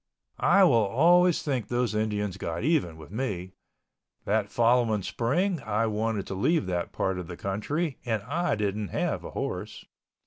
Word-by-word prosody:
I 195 - +5
will 180 - +5
always 175 - +4
think 130 -6 -1
those 120 -2 0
Indians 105 -3 -1
got 85 0 -4
even 135 - +1
with 80 +1 -12
me. 100 -6 -3 0.7
That 105 0 +1
following 115 -3 +2
spring 170 - 0
I 110 +1 0
wanted 110 -2 -1
to - - -5
leave 130 - +1
that 90 -2 -2
part 95 -1 -1
of 90 - -6
the 85 -1 -8
country, 135 - -2
and 110 -4 -1
I 155 - 0
didn't 105 0 -2
have - - -2
a - - -6
horse. - - -5
110 Hz, 165 wpm, -27 LUFS, 100-140 Hz, 0.7 s, I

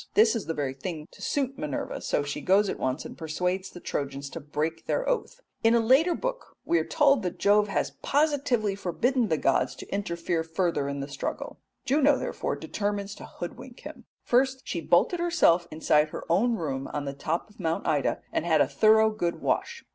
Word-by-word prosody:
'" - - -47
This 220 +2 +5
is 225 - -3
the 165 - -2
very 140 -3 -2
thing 155 +2 -6
to - - -16
suit 270 -2 -1
Minerva, 150 -3 -4
so 145 - 0
she 145 0 -4
goes 195 +2 +3
at - - -4
once 130 +2 -2
and - - -8
persuades 180 +4 -2
the 175 - -11
Trojans 140 -3 -4
to - - -6
break 155 +2 -3
their - - 0
oath. - - -2 0.2
In 225 +1 +5
a - - +5
later 270 +10 +4
book - - -5
we 170 - +3
are - - 0
told 275 - +3
that 180 -3 -3
Jove 205 +1 +4
has 200 - -1
positively 275 -8 +1
forbidden 230 +6 0
the 160 - +1
gods 135 -2 +1
to - - -9
interfere 170 -4 -1
further 165 -3 -1
in 140 0 -3
the 140 - -4
struggle. 145 -1 -5 0.3
Juno 280 +1 +4
therefore - - -3
determines 205 -1 -3
to - - -10
hoodwink 245 +8 -8
him. 295 -5 -10 0.2
First 260 +2 +2
she 170 - -3
bolted 175 - +3
herself 300 - +3
inside 155 -1 +2
her - - -6
own 230 +7 +3
room 135 -8 -3
on 145 -1 -3
the 140 - -3
top 155 +4 -2
of 210 - -22
Mount 165 -2 -1
Ida 145 -4 0
and - - 0
had 160 -2 +3
a - - +4
thorough 220 0 +4
good 175 -5 -2
wash. 470 0 -1
190 Hz, 205 wpm, -27 LUFS, 155-245 Hz, 0.3 s, This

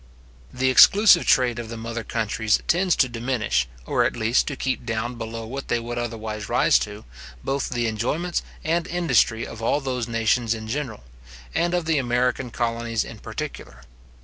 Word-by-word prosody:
The 130 +1 +1
exclusive 195 +5 +7
trade 120 -2 +3
of 115 -2 -6
the 115 - -6
mother 115 0 -5
countries 110 -1 0
tends 180 +1 +3
to 130 - +3
diminish, 115 - -1 0.2
or - - +2
at - - 0
least 115 +1 +1
to 145 - -3
keep 130 0 -2
down 115 +1 -2
below 115 -1 -6
what 135 +4 -6
they 120 - +1
would 120 +1 -4
otherwise 110 -3 -5
rise - - +4
to, 105 0 -6 0.4
both 135 0 -1
the 120 -2 -1
enjoyments 145 +11 -1 0.2
and 170 +2 0
industry 130 -9 +2
of 115 - -9
all 115 +5 +1
those 125 -4 -3
nations 115 0 +1
in 110 0 -7
general, 120 - -4 0.5
and 175 +1 +1
of 175 -2 -1
the 160 -2 +2
American 125 0 0
colonies 115 -1 -1
in - - -10
particular. - - -7
120 Hz, 175 wpm, -24 LUFS, 115-135 Hz, 0.5 s, exclusive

